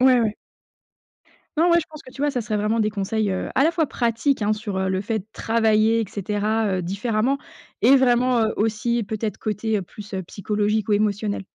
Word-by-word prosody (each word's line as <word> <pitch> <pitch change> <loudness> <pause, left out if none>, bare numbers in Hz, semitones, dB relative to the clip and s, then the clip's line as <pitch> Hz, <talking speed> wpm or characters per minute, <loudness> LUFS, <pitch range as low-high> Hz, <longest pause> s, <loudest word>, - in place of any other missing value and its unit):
Ouais, 255 -1 +6
ouais. 215 -2 0 1.2
Non, 340 +2 +4
ouais 340 - +6
je 310 - -8
pense 310 -1 -12
que - - -13
tu 270 +2 -7
vois, 295 - +2
ça 255 -3 -2
serait 215 -2 -2
vraiment 215 +2 +1
des 215 - +2
conseils, 210 0 -1
heu, 185 - -3
à 270 - +4
la 320 - +4
fois 335 -2 +1
pratiques 240 +2 0
hein, 210 0 +2
sur 210 -3 -4
le 190 0 0
fait 215 -2 -3
travailler 225 0 +2
et - - 0
cetera, 210 +3 -1
heu, - - -3
différemment 215 +8 0 0.5
et 270 - +7
vraiment 250 -1 +3
heu, 220 -1 +1
aussi 230 +2 0
peut-être 215 +1 -3
côté, 215 +1 -2
heu, 200 - -1
plus, 205 +3 -10
heu, 190 - -2
psychologique 210 +3 -1
ou - - +2
émotionnel. 205 -1 0
220 Hz, 205 wpm, -23 LUFS, 210-240 Hz, 1.2 s, et